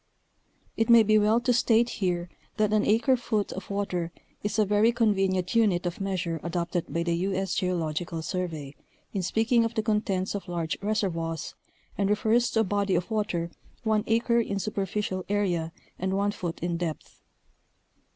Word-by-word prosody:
It 225 0 +1
may 235 -1 +8
be 215 0 +4
well 215 +2 +4
to 245 +1 +2
state 235 -1 +4
here 175 -2 0 0.3
that 215 0 +2
an 215 0 +3
acre 230 +5 +4
foot 220 -5 -1
of 190 - -7
water 185 -4 -2 0.3
is 205 - -2
a 215 - +4
very 210 +3 +4
convenient 195 -6 +1
unit 205 -6 +3
of 175 +3 -3
measure 180 -4 -2
adopted 170 -1 -2
by 170 +3 0
the 170 0 0
U. 190 +3 -1
8. 190 0 -1
Geological 170 -2 -1
Survey 160 -6 -4 0.4
in 195 - -1
speak 220 +6 -1
ing 235 -2 +6
of 230 0 -2
the 220 - 0
contents 210 -3 0
of 200 -1 -5
large 170 -2 -2
reservoirs, 175 -7 -2 0.5
and 200 -1 +2
refers 220 +3 +2
to 225 - +2
a - - +3
body 200 -1 0
of 180 - -1
water 180 -6 -1 0.3
one 215 -2 +2
acre 235 +1 +3
in 200 -3 -1
superficial 195 -1 -2
area 180 -6 0 0.3
and 190 +1 -1
one 200 +1 +1
foot 175 -4 -5
in 170 0 -1
depth. 165 -3 -5
195 Hz, 175 wpm, -27 LUFS, 175-215 Hz, 0.5 s, may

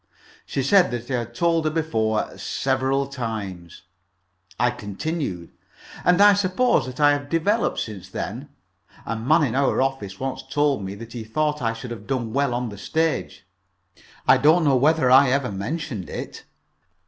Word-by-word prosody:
She 135 - -2
said 185 +6 +5
that 120 +1 -5
I 125 - +1
had 120 0 -7
told 165 +2 +1
her - - +3
before 115 -9 -1
several 135 +1 0
times. 110 -10 -6 0.8
I 125 0 +3
continued: 105 - -4 0.5
"And 180 +1 +4
I 205 0 +8
suppose 200 - +1
that 130 +1 -8
I 145 -1 +6
have 145 0 -2
developed 200 +8 +1
since 105 -5 -6
then. - - -5 0.6
A 115 - -2
man 150 +9 +3
in 130 - 0
our 135 0 +2
office 130 -8 -2
once 130 0 -3
told 145 -6 0
me 95 +1 -5
that 115 +2 -10
he 120 -2 -5
thought 150 +6 -1
I 115 -1 0
should 115 +2 -8
have 115 - -8
done 120 -5 -2
well 140 -2 +1
on 120 -1 -2
the 100 -2 -10
stage. 160 - -2 0.8
I - - +7
don't 160 +4 +4
know 140 -2 +4
whether 140 0 +3
I 135 +1 +7
ever 130 -3 0
mentioned 105 - -4
it." - - -7
130 Hz, 170 wpm, -23 LUFS, 115-155 Hz, 0.8 s, I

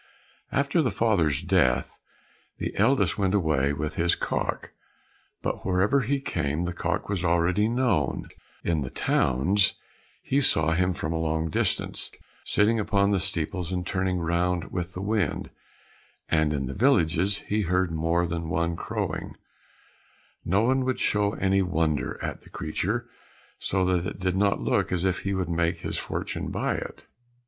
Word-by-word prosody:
After 140 +4 +2
the 130 - +1
father's 90 -9 +1
death 85 -9 +1 0.6
the - - -4
eldest 100 - +2
went 95 0 +2
away 75 -7 +2
with 75 +1 -4
his 85 0 +3
cock, - - -2 0.7
but - - -2
wherever 95 +8 +2
he 135 +4 0
came 80 - -2
the 90 0 -2
cock - - -2
was 100 -3 -2
already 85 +4 +2
known; 115 - 0 0.4
in 80 -3 0
the 65 - -3
towns 95 +15 +2 0.5
he 140 +2 +1
saw 80 - +3
him 90 +2 +1
from 80 - -3
a 80 - -1
long 80 0 -1
distance, - - 0 0.3
sitting 110 +2 +2
upon 100 -1 +2
the 100 - +2
steeples 90 -1 +1
and 90 -1 -2
turning 95 -1 0
round 85 +1 0
with 90 0 -4
the 95 - -4
wind, 105 -6 -1 0.8
and 80 -1 +2
in 70 -3 -1
the 65 - -4
villages 95 - +2
he 105 +1 +1
heard 90 -1 +1
more 85 +2 +1
than 85 -1 -3
one 85 +1 0
crowing; - - -4 1.1
no 95 +4 +2
one 130 +2 +2
would 130 0 -1
show 105 0 +1
any 95 0 +2
wonder 80 -5 0
at - - -4
the - - -17
creature, 95 +8 -2 0.5
so 95 -1 0
that 90 0 +1
it 100 - -6
did 90 -1 0
not 100 +1 +2
look - - 0
as 90 0 0
if 95 -1 +1
he 100 0 -2
would 95 -2 -1
make 85 0 0
his - - -3
fortune - - -4
by - - -1
it. - - -7
90 Hz, 160 wpm, -26 LUFS, 80-100 Hz, 1.1 s, his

